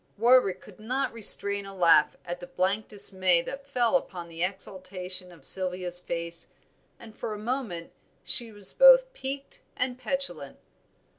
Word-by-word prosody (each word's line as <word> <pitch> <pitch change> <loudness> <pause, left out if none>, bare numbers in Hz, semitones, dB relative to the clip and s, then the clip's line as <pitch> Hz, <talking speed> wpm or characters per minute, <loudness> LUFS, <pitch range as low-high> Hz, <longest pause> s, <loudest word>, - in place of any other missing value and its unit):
Warwick 230 -5 +3
could 205 -2 -17
not 255 +5 -3
restrain 200 -2 +3
a 195 - -11
laugh 165 -4 +3
at 175 0 -6
the 175 - -10
blank 195 +5 -2
dismay 185 -4 0
that 275 +6 -9
fell 250 -2 0
upon 180 -9 -3
the 165 +1 -5
exultation 185 -1 -4
of 170 - -18
Sylvia's 180 -1 +3
face, 170 -1 -2 0.5
and 220 -2 -14
for 215 - -6
a - - -8
moment 215 -7 -5 0.3
she 235 -2 +4
was 205 -2 +2
both - - +6
piqued 280 - -8 0.2
and 255 0 -3
petulant. 175 - -4
195 Hz, 150 wpm, -26 LUFS, 180-250 Hz, 0.5 s, both